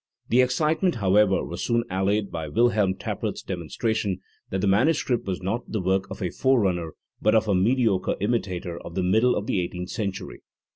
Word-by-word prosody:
The 125 +2 +5
excitement, 155 +6 +1
however, 100 -2 +3
was 85 - -5
soon 115 -1 +1
allayed 100 +2 0
by 80 -2 -4
WilhelrnTappert's 105 -2 0
demonstra 95 +5 -2
tion 100 -4 -1 0.3
that 95 - -2
the 100 - +1
manuscript 120 +3 +2
was 95 -1 -3
not 110 +6 -3
the 110 - -1
work 95 +1 0
of - - -6
a 90 - -1
forerunner 95 - +1 0.3
but 110 +1 +3
of 110 0 +3
a 100 - +2
mediocre 105 0 +2
imitator 95 -6 -2
of 85 - -9
the 95 - 0
middle 110 +7 +3
of 100 - -2
the 100 - 0
eighteenth 90 +1 -5
century. 100 -4 -4
100 Hz, 180 wpm, -25 LUFS, 95-115 Hz, 0.3 s, The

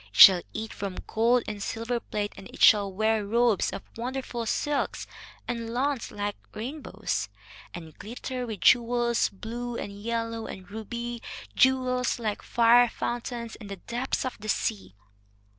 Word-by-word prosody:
It 105 - -12
shall 185 -3 +11
eat 220 0 -5
from 195 -2 -5
gold 235 +2 +3
and 210 -1 -5
silver 230 +3 -2
plate, 210 -2 -3
and 190 - -10
it - - -4
shall 205 -2 +7
wear 220 +2 +1
robes 230 0 +2
of - - -6
wonderful 245 -1 -4
silks 290 +5 -1 0.4
and 230 -1 -3
lawns 260 +1 -1
like 205 0 -3 0.2
rainbows, 265 +8 -3 0.4
and 160 -3 -9
glitter 250 +3 -5
with 215 -6 -6
jewels, 235 +4 +4
blue 235 +4 -5
and 205 - -5
yellow 230 0 -2
and 185 -1 -8
ruby, 235 +2 -5 0.3
jewels 255 -1 +3
like 215 -3 -2
fire 235 +1 +5
fountains 235 -1 -4
and 210 -3 -10
the 195 - -5
depths 245 +8 -2
of 255 - -4
the 215 +1 -7
sea." 95 - -1
230 Hz, 150 wpm, -27 LUFS, 210-245 Hz, 0.4 s, shall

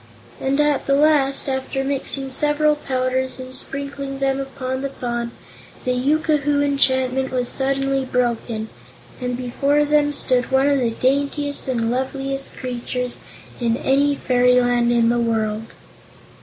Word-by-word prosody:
And 270 +2 0
at 295 -2 +1
the 275 - +4
last, 285 -2 +3
after 265 0 -2
mixing 270 0 +2
several 295 +2 +2
powders 260 -2 -2
and 255 0 -8
sprinkling 275 0 -5
them 270 0 0
upon 260 -1 -4
the 275 - -2
Fawn, 240 -3 -3 0.6
the 255 - +1
yookoohoo 290 +2 +1
enchantment 265 -2 +1
was 250 -1 -1
suddenly 270 0 0
broken 235 -3 -1 0.5
and 250 -1 -2
before 280 +4 +1
them 295 0 +2
stood 255 -3 +1
one 265 +1 +3
of 285 -1 +3
the 240 -2 +1
daintiest 280 +4 0
and 230 -3 0
loveliest 270 +2 -3
creatures 250 0 -4 0.4
in 235 -1 +1
any 280 +2 +2
fairyland 245 -2 +3
in 235 -1 +3
the 240 0 +2
world. 225 -1 -1
265 Hz, 135 wpm, -21 LUFS, 250-280 Hz, 0.6 s, the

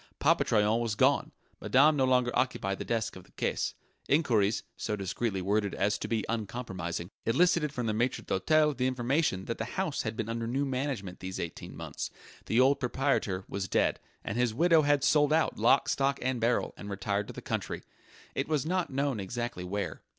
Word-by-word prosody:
Papa - - +3
Troyon 105 +1 +2
was 115 -3 -1
gone; - - +3 0.3
Madame 150 +4 +5
no 135 -2 +3
longer 125 -1 +3
occupied 100 -7 0
the - - -3
desk 115 -3 -1
of 95 - -10
the - - -23
caisse; - - -1 0.3
enquiries, 115 -8 +2
so 105 - -2
discreetly 95 0 -2
worded 100 +1 0
as 105 +1 +1
to - - -4
be 110 -2 -1
uncompromising, 95 -6 -4 0.2
elicited 160 +4 +3
from 125 -3 -3
the 110 - 0
maitre 120 +4 0
d'hôtel 150 +8 +2
the 125 0 +1
information 130 - 0
that 115 - -4
the 110 +2 -5
house 185 -6 0
had 110 -1 -4
been 110 - -2
under 115 0 -3
new 135 +4 0
management 130 -8 -3
these 95 0 -5
eighteen 85 - -6
months; - - -5 0.4
the 115 - +2
old 135 +2 +5
proprietor 125 -8 0
was 100 -1 -3
dead, - - +1 0.2
and 105 - -3
his 120 -3 +1
widow 165 +2 +5
had 145 -1 +2
sold 150 0 +4
out 160 -6 +2
lock, 135 +6 +4
stock 140 -4 +1
and 130 -2 -1
barrel, 120 +2 +1
and 100 - -8
retired 100 +1 -2
to - - -8
the - - -7
country - - -4 0.5
it - - -2
was 150 -2 0
not 180 +2 0
known 135 -3 -1
exactly 120 0 -4
where. 100 +3 -3
120 Hz, 195 wpm, -30 LUFS, 105-140 Hz, 0.5 s, Madame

